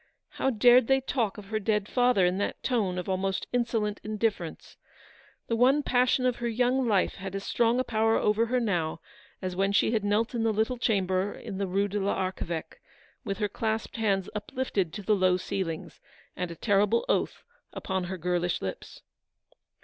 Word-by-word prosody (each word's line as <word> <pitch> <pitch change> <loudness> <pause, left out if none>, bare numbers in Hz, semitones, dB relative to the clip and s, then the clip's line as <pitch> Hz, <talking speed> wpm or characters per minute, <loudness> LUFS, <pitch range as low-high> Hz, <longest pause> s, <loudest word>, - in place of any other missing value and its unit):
How 265 - -1
dared 245 0 +5
they 270 0 +4
talk 245 -5 -1
of 200 -1 -10
her 215 -1 -1
dead 210 -1 0
father 245 -7 +3
in 180 +2 +1
that 205 - -3
tone 210 -8 0
of 180 - -4
almost 190 0 -1
insolent 225 -4 0
indifference. 210 -6 -3 0.7
The 230 - -1
one 265 +5 +4
passion 250 0 +2
of 250 -1 +1
her 240 - -2
young 250 +2 +1
life 200 -4 +1
had 195 +1 -6
as 195 - -4
strong 235 +3 +2
a - - +2
power 225 -1 +2
over 215 +2 +2
her 250 +2 +1
now 175 -9 -1 0.4
as 185 -1 -3
when 195 +1 +1
she 200 - +3
had 220 -3 0
knelt 210 +4 +1
in 235 - -1
the 225 0 +2
little 220 +4 0
chamber 195 -3 +1
in 195 - -7
the 200 - -1
Rue 195 +2 +1
de 205 +1 -2
l'Archeveque, 185 -4 -3 0.4
with 200 -5 -3
her 210 - 0
clasped 220 +3 -3
hands 195 -4 +1
uplifted 210 -4 -2
to 205 - -6
the 210 - +2
low 185 -2 +3
ceiling, 180 -3 -4 0.4
and 180 -1 -3
a 170 - -7
terrible 205 +4 +2
oath - - 0 0.3
upon 190 -2 -3
her 185 +1 -5
girlish 175 0 -1
lips. 95 - -7
210 Hz, 185 wpm, -28 LUFS, 190-235 Hz, 0.7 s, dared